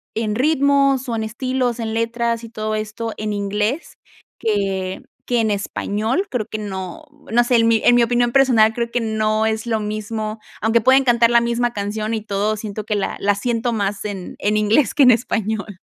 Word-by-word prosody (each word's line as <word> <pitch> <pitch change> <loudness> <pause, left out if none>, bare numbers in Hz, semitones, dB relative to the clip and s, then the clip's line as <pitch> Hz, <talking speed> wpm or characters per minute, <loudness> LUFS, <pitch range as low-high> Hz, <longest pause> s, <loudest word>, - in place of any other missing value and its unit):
en 215 -1 -1
ritmos 275 -1 +2
o 230 - -1
en 220 - -2
estilos, 250 +1 -2
en 225 -1 -3
letras, 230 0 -1
y 230 - -8
todo 215 -1 -3
esto 215 +1 -4
en 215 0 -3
inglés 210 +8 -2 0.4
que 195 -3 -1 0.3
que 245 -1 +1
en 220 -1 +1
español 215 - -2
creo 240 -4 -1
que - - -4
no, 195 - -6 0.3
no 240 +2 +4
sé, 245 - +2
en 230 0 +3
mi 225 -1 +3
en 245 - +6
mi 240 - +5
opinión 240 0 +1
personal 235 -5 +5
creo 235 0 -2
que 245 - 0
no 220 0 0
es 220 +1 -1
lo 225 -2 0
mismo, 215 +1 -4 0.2
aunque 225 +2 +2
pueden 265 +4 +5
cantar 235 -2 +4
la 235 0 +5
misma 235 0 0
canción 215 +2 -3
y 220 - -3
todo, 210 +1 -1
siento 210 0 -5
que 210 - -1
la 200 - -2
la 205 0 +2
siento 235 +2 -1
más 205 -2 -2
en 195 -3 -6
en 210 +1 +1
inglés 215 +6 +2
que 290 - +5
en 250 - +8
español. 220 -4 -1
220 Hz, 200 wpm, -20 LUFS, 210-240 Hz, 0.4 s, en